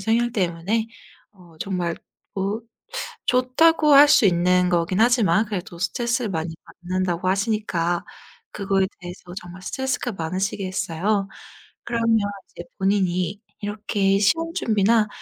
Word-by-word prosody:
성향 230 +4 +1
때문에 195 +4 -1 0.4
어 180 -5 -19
정말 180 -3 -2 0.4
뭐 200 +3 -2 0.7
좋다고 290 +5 +4
할 290 +1 +9
수 245 - +5
있는 180 0 +3
거긴 175 +2 +1
하지만 225 -4 +4
그래도 195 -3 -5
스트레스를 235 +4 -1
많이 165 0 -3 0.3
받는다고 185 -1 -1
하시니까 190 -4 0 0.5
그거에 195 -2 0
대해서 175 0 -9 0.2
정말 180 +1 -11
스트레스가 265 -1 -2
많으시겠어요. 190 +2 -2 0.6
그러면 230 -1 +1 0.3
이제 - - -9
본인이 190 -1 0 0.2
이렇게 205 -1 0
시험 330 +10 +2
준비나 215 - +2
195 Hz, 290 characters per minute, -23 LUFS, 180-225 Hz, 0.7 s, 할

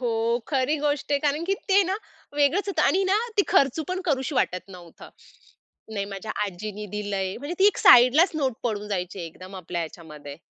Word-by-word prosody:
हो, 230 -1 0
खरी 275 +1 +1
गोष्ट 290 0 -1
आहे. 285 - +3
कारण 295 +2 0
की 390 +3 +1
ते 395 0 +5
ना, 375 - -1 0.4
वेगळंच 295 +8 +2
होतं 395 - 0
आणि 385 - +3
ना 415 - +4 0.2
ती 405 - +5
खर्च 280 -5 +3
पण 370 +1 -2
करावीशी 275 -3 -1
वाटत 185 -7 -1
नव्हतं. 175 -3 -13 0.8
नाही 200 -2 -2
माझ्या 200 +2 -6
आजीनी 210 +2 -6
दिलंय. 200 -2 -3
म्हणजे 290 +7 -5
ती 390 - +6
एक 415 - +2
साइडलाच 255 +9 +7
नोट 270 -5 0
पडून 210 -3 -3
जायची 185 -1 -4
एकदम 185 +4 -12
आपल्या 170 +1 -4
ह्याच्यामध्ये. 155 -3 -9
240 Hz, 185 wpm, -25 LUFS, 195-295 Hz, 0.8 s, साइडलाच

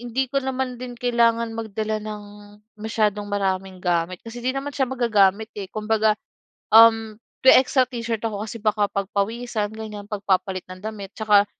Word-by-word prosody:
hindi 245 +2 -1
ko 275 - +2
naman 260 -2 -3
din 245 -1 -7
kailangan 235 -1 +2
magdala 220 -1 -3
ng 210 -1 -6 0.6
masyadong 210 -2 0
maraming 190 -2 -1
gamit 175 +1 -1
kasi 235 +1 -8
'di 260 +2 -1
naman 285 +1 -3
siya 265 -2 0
magagamit 220 -4 +2
eh. 200 -3 -6
Kumbaga, 215 0 +1 0.6
um, 225 -1 +7 0.3
may 260 - +9
extra 260 0 +2
t-shirt 230 -3 -3
ako 210 -2 -2
kasi 230 +1 -7
baka 210 -1 +2
pagpawisan 210 +3 -2
ganiyan. 210 -2 -8
'Pag 205 -2 -5
papalit 185 -1 0
ng 185 0 -9
damit 205 -3 -6
tsaka 210 -2 +4
220 Hz, 160 wpm, -23 LUFS, 205-235 Hz, 0.6 s, may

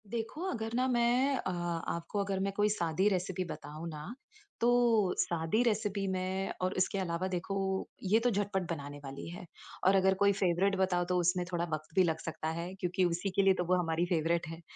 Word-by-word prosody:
देखो, 230 +7 -4
अगर 225 -4 -3
ना 255 +1 +2
मैं 250 +2 +3
अ, - - -3
आपको 170 +1 -3
अगर 195 -1 -2
मैं 195 +1 0
कोई 205 +1 +2
साधी 175 -1 +1
रेसिपी 185 -1 -1
बताऊँ 160 -1 -7
ना, 155 +7 -7 0.5
तो 235 -5 +4
साधी 170 +6 +1
रेसिपी 210 -3 0
में 190 +1 -1
और 185 +1 0
इसके 185 +1 +1
अलावा 180 0 -1
देखो, 190 +1 -2 0.2
ये 205 +4 +4
तो 245 +2 +2
झटपट 200 -4 -1
बनाने 145 -2 -5
वाली 135 0 -7
है। 180 +1 -8 0.4
और 195 - +6
अगर 190 0 +4
कोई 200 - +6
फ़ेवरेट 190 +1 +2
बताऊँ, 180 -2 +2
तो 180 - +2
उसमें 180 +1 +1
थोड़ा 170 -1 0
वक़्त 155 +1 -5
भी 185 - +6
लग 160 -2 0
सकता 160 -1 -5
है 175 +2 -5
क्योंकि 185 -1 0
उसी 175 +3 -1
के - - +5
लिए 195 -1 +5
तो 180 - -1
वो 185 +2 +3
हमारी 165 0 0
फ़ेवरेट 170 -1 0
है। 165 +1 -8
185 Hz, 200 wpm, -32 LUFS, 170-200 Hz, 0.5 s, और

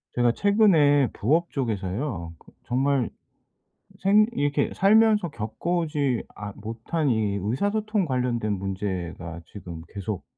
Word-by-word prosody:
제가 120 -1 +3
최근에 160 - +4
부업 160 +10 +1
쪽에서요. 105 - -3
거 - - -20
정말 135 -1 +1 0.9
생 205 +3 +5
이렇게 145 - 0
살면서 210 -2 +4
겪어오지 140 +3 -1
아 105 -1 -7
못한 115 +8 -2
이 110 -4 +1
의사소통 205 - 0
관련된 125 -6 -1
문제가 95 -4 -4
지금 85 -5 -9
계속 100 -1 -4
125 Hz, 250 characters per minute, -25 LUFS, 105-170 Hz, 0.9 s, 생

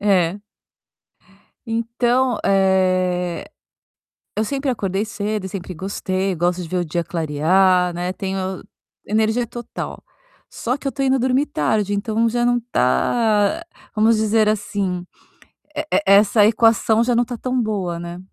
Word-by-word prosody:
É. 190 -2 +2 1.3
Então, 240 +2 +1
eh, 185 -2 +1 0.9
eu 215 - +1
sempre 270 +4 -1
acordei 200 -3 -2
cedo 210 -2 -3
e - - -3
sempre 185 -2 -6
gostei, 190 +1 -2
gosto 175 +1 0
de - - -7
ver 180 +3 -2
o 175 - 0
dia 170 +2 -2
clarear, 175 +3 +2
né, 175 +1 -3
tenho 190 0 -4 0.7
energia 220 +3 +1
total. 240 0 -7 0.5
Só 245 +2 -2
que 280 - -6
eu - - +2
estou 275 0 -2
indo 265 0 +2
dormir 260 +3 +2
tarde, 205 - 0
então 220 +3 0
já 240 +1 0
não 245 0 +3
está, 225 - +1 0.3
vamos 220 +1 +4
dizer 215 0 +2
assim, 195 -4 -2 0.7
e - - +1
e - - +3
essa 205 +2 +5
equação 225 +1 +4
já 245 0 +1
não 235 - +4
está 245 0 -3
tão 255 +1 -1
boa, 190 -6 -2
né? 170 +1 -7
205 Hz, 145 wpm, -20 LUFS, 185-230 Hz, 1.3 s, essa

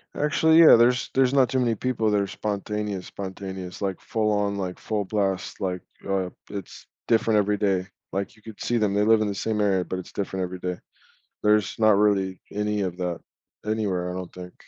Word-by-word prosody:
Actually, 160 +2 +4
yeah, 165 - +10
there's 120 +1 +3
there's 130 -1 +3
not 130 -3 +4
too 130 0 +1
many 120 -2 +1
people 115 -1 0
that 105 - +3
are 100 - -1
spontaneous, 105 -1 -3
spontaneous, 95 -2 -7
like, 95 -2 -2
full 110 -1 0
on, 105 -1 0
like, 95 -2 -4
full 105 -2 -2
blast, 95 -2 -1
like, 90 -2 -2 0.3
uh, 95 -2 0 0.2
it's 100 -1 -8 0.2
different 115 -1 +3
every 105 0 +2
day, 95 -3 +1 0.3
like, 100 +2 -3
you 110 - -22
could 110 -1 -11
see 120 - 0
them, 105 -3 +1
they 105 +1 +2
live 110 0 +5
in 105 - +1
the 100 - -2
same 110 +2 -1
area, 95 -3 +2
but 95 - -4
it's 90 - -9
different 95 -1 -2
every 90 0 -5
day. 90 0 -3 0.6
There's 105 -1 +3
not 110 -2 +5
really 100 -3 +2
any 105 0 -1
of 90 -2 -3
that 90 -2 -2 0.5
anywhere, 100 -5 -1
I - - -5
don't 90 -1 -6
think. 90 0 -9
100 Hz, 205 wpm, -25 LUFS, 95-110 Hz, 0.6 s, yeah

